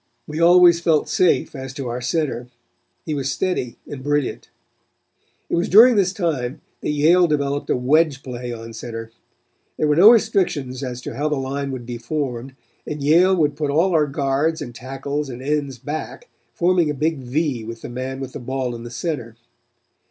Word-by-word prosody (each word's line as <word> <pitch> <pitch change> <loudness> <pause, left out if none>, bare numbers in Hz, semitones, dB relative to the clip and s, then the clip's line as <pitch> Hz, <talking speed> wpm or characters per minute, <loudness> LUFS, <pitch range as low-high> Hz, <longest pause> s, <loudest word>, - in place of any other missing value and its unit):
We 155 +1 -5
always 175 0 +6
felt 165 -3 +2
safe 180 -3 +2
as 135 -1 -7
to 135 -4 -4
our 120 +1 -4
center. 125 -2 -2 0.6
He 155 - -2
was 135 -2 -1
steady 155 -8 -2
and 140 -2 -8
brilliant. 145 -1 -1 1.0
"It - - -7
was 170 - 0
during 230 +5 +8
this 190 -3 +3
time 150 -8 -2 0.2
that - - -3
Yale 165 +5 +4
developed 145 -2 -1
a - - +3
wedge 140 +2 +2
play 125 -1 -6
on 115 -1 -8
center. 115 0 -7 0.7
There 155 - +1
were 150 - +3
no 190 +7 +9
restrictions 185 - +2
as 125 -1 -5
to - - -6
how 150 +3 -1
the 150 - 0
line 140 +1 -3
would 130 -3 -6
be 120 -1 -6
formed, 130 0 -4 0.3
and 150 -2 -4
Yale 175 +6 +5
would 150 -4 +1
put 150 -1 -2
all 165 +7 +2
their 155 -3 +3
guards 140 +3 0
and 120 - -7
tackles 135 +3 -4
and 120 -1 -7
ends 140 -1 -2
back, 155 - -6 0.2
forming 175 -2 +2
a 150 - -2
big 155 +1 0
V 130 -1 -2
with 115 +1 -8
the - - -5
man 130 +2 -5
with 135 -1 -6
the - - -6
ball 130 0 -3
in 115 - -7
the 120 - -8
center. 120 -3 -4
140 Hz, 190 wpm, -21 LUFS, 125-160 Hz, 1.0 s, no